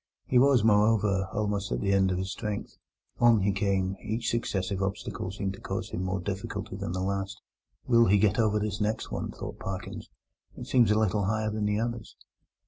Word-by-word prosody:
He 125 - +3
was, 130 -3 +5
moreover, 105 -3 +3
almost 105 -4 -2
at - - 0
the 100 - 0
end 95 -1 +4
of 90 - 0
his 95 +1 -3
strength. 105 -2 -4 0.4
On 120 -3 +5
he 100 +1 +2
came; 95 -1 0
each 110 +2 -2
successive 100 -4 -1
obstacle 95 -1 -3
seemed 95 0 -3
to 95 - -12
cause - - -4
him 90 - -3
more 95 0 -1
difficulty 95 +1 -4
than 85 - -4
the 95 0 -2
last. 100 +1 -2 0.5
"Will 115 -1 +5
he 100 - +5
get 105 +1 +2
over 105 -2 +3
this 105 0 -2
next 105 +1 -1
one?" - - -3
thought - - -7
Parkins; 95 -1 -6 0.5
"it - - -6
seems 120 -4 +4
a 105 - +3
little 105 -2 +1
higher 110 +1 0
than 105 0 -1
the 105 0 +1
others." 115 -1 -4
105 Hz, 200 wpm, -28 LUFS, 95-110 Hz, 0.5 s, was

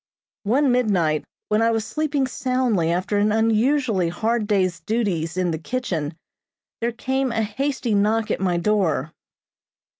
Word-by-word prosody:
One 260 +6 +3
midnight, 185 -11 +1 0.2
when 215 +1 +2
I 230 - +4
was 225 -1 0
sleeping 295 -2 -1
soundly 250 -9 0
after 185 +4 0
an 210 +1 +2
unusually 225 -2 +2
hard 220 +5 -1
day's 185 -4 +1
duties 175 -4 -1
in 180 -2 +1
the 160 - -3
kitchen, 170 - -3 0.6
there 235 +1 0
came 265 +2 -1
a 225 -1 0
hasty 255 +2 -2
knock 215 +2 +2
at - - -1
my 180 -2 +1
door. 170 -6 +1
215 Hz, 145 wpm, -23 LUFS, 180-245 Hz, 0.6 s, I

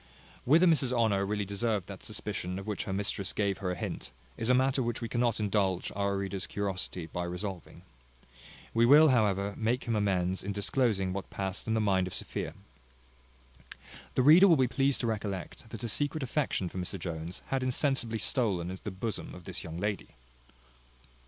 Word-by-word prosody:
Whether 160 +8 +6
Mrs 150 -7 +4
Honour 110 -5 +2
really 105 0 -1
deserved 100 -1 -1
that - - -9
suspicion, 90 +1 -4
of 95 - -6
which 105 -2 -3
her - - -4
mistress 100 -1 -1
gave 100 -2 0
her 95 -2 -2
a 90 - -1
hint, - - -5 0.3
is 115 +1 -2
a 125 - +6
matter 130 +1 +2
which 120 -2 -2
we 115 - -3
cannot 120 -1 0
indulge 100 -3 0
our 100 0 0
reader's 95 -1 -3
curiosity 95 -3 -3
by 90 +2 -4
resolving. 90 0 -6 0.9
We 115 - +3
will, 150 +6 +8
however, 100 -5 +2
make 120 +3 0
him 115 -2 -1
amends 95 -3 +1
in 100 +1 -3
disclosing 100 -2 +1
what 100 0 -5
passed 95 +1 -4
in 110 - +1
the - - +2
mind 95 -3 +2
of 90 - -5
Sophia. - - -4 1.6
The 130 - +3
reader 165 +8 +8
will 165 -4 +6
be 130 -1 +3
pleased 135 +2 +1
to - - -1
recollect, 105 -1 -4
that 115 +1 -7
a - - -1
secret 145 +5 0
affection 130 -7 -1
for 95 - -5
Mr 90 +2 -4
Jones 85 0 -6
had 135 -1 0
insensibly 130 -3 0
stolen 100 - 0
into 95 - -7
the - - -4
bosom 100 +3 -5
of 90 - -11
this - - -3
young 80 0 -6
lady. 100 +2 -3
105 Hz, 185 wpm, -30 LUFS, 95-120 Hz, 1.6 s, will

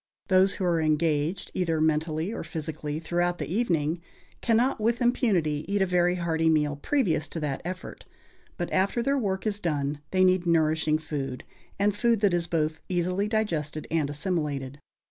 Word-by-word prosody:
Those 190 +1 +5
who 195 - -4
are 170 -2 +2
engaged, 155 +2 0
either 165 -4 0
mentally 160 +4 0
or - - -4
physically, 155 -2 -4
throughout 175 +2 0
the - - -3
evening, 170 -7 0 0.4
cannot 235 +2 +2
with 230 +2 +1
impunity, 190 - +1
eat 205 - +2
a - - +2
very 180 -1 +2
hearty 165 -2 +1
meal 150 -2 +2
previous 160 - 0
to 165 - -5
that 145 -3 -2
effort; 180 +2 -7 0.5
but - - -3
after 195 +5 +1
their 275 +1 +1
work 190 -4 -2
is 205 -1 -1
done 145 -4 -1
they 185 0 +3
need 185 -1 +3
nourishing 155 -1 +3
food, 140 -4 -5 0.3
and 200 0 +2
food 230 0 +2
that 200 -4 +3
is 175 -1 0
both 155 -2 -1
easily 180 +3 0
digested 165 -9 -1
and 160 -3 +1
assimilated. 145 -4 -2
170 Hz, 165 wpm, -27 LUFS, 155-190 Hz, 0.5 s, Those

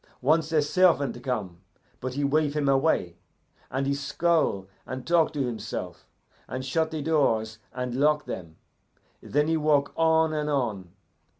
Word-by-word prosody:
Once 155 +3 +2
a 155 -2 +3
servant 145 -7 +2
come, 105 -10 -3 0.4
but 130 0 -5
he 145 - -1
wave 150 +1 +1
him 150 -2 0
away, 135 - +2 0.5
and 135 +1 -1
he 140 - +1
scowl 140 - 0 0.2
and 130 0 -7
talk 170 -2 +3
to 145 -3 -1
himself, 115 -4 -6 0.4
and 130 0 -5
shut 160 +4 0
the 155 -2 -4
doors 115 -8 +1
and 125 -1 -4
lock 150 +3 +2
them. 85 -3 -7 0.7
Then 150 +2 0
he 160 0 +2
walk 150 -2 +2
on 160 -1 +3
and 150 -1 -1
on. 110 -10 -1
140 Hz, 155 wpm, -26 LUFS, 125-155 Hz, 0.7 s, a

